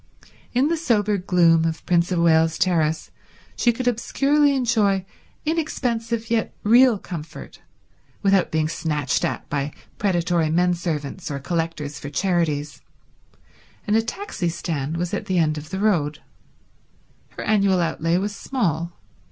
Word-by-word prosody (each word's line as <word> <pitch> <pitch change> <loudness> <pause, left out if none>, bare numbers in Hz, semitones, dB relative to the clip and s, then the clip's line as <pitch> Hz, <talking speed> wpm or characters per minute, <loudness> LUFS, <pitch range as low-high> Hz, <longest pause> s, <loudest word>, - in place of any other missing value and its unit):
In 255 +4 +2
the 335 +1 0
sober 215 -9 +1
gloom 170 -3 +4
of 165 -1 -2
Prince 175 0 +2
of 180 - +1
Wales 160 -1 +3
Terrace 160 -4 +1 0.4
she 240 - +3
could 245 +2 -4
obscurely 280 +5 +2
enjoy 215 -7 +1 0.4
inexpensive 235 -8 -2
yet 225 -2 0
real 235 +1 +6
comfort, 165 -4 -9 0.6
without 195 -2 +3
being 155 -1 0
snatched 150 -4 -1
at - - -2
by 145 0 -2 0.3
predatory 175 -4 +1
men 180 +3 +2
servants 165 -1 -4
or 140 - -3
collectors 155 -1 -3
for 145 - -6
charities, 150 -3 -1 1.0
and 210 - +1
a 225 - +4
taxi 230 - -3
stand 160 -2 -3
was 175 0 -3
at - - -3
the 185 - 0
end 155 -2 +2
of 155 +1 -11
the 190 - -4
road. 170 -8 +1 1.2
Her - - -4
annual 195 -3 +3
outlay 165 0 0
was 205 +2 -2
small. 170 - -2
175 Hz, 140 wpm, -23 LUFS, 160-220 Hz, 1.2 s, real